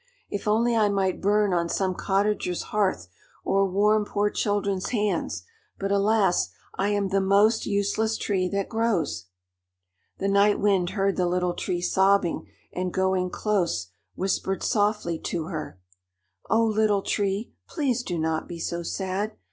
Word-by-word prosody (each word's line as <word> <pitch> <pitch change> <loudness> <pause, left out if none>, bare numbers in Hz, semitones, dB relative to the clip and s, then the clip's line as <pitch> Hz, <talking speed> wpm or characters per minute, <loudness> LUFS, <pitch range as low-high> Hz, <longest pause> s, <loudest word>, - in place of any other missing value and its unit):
If 205 +1 -4
only 230 +3 +3
I 215 -2 +3
might 195 -2 0
burn 205 0 +2
on 170 -1 0
some 190 0 0
cottager's 195 -1 0
hearth 200 - +1 0.4
or 195 0 +2
warm 210 +3 +3
poor 205 0 0
children's 200 -2 -1
hands; 210 -4 -1 0.3
but 195 0 -2
alas, 200 -2 +2 0.2
I 195 - -1
am 205 -1 0
the 195 0 +2
most 205 +4 +3
useless 205 +2 0
tree 185 -3 0
that 200 0 -1
grows!" 195 - -1 0.9
The 195 - -1
Night 200 +1 +4
Wind 195 -4 +2
heard 195 0 +1
the 180 -1 +2
Little 180 0 0
Tree 175 0 -3
sobbing, 190 -1 +2 0.3
and 185 0 -2
going 190 0 +1
close, 175 - -1 0.3
whispered 190 0 -1
softly 205 -6 0
to 165 0 -3
her: 155 - -6 0.7
"Oh, 225 +2 +4
Little 215 -2 +2
Tree, 200 +2 -1
please 270 -7 -1
do 180 -7 -4
not 160 0 -1
be 175 - -7
so 170 +1 -3
sad. 190 +4 -3
195 Hz, 150 wpm, -25 LUFS, 185-210 Hz, 0.9 s, Night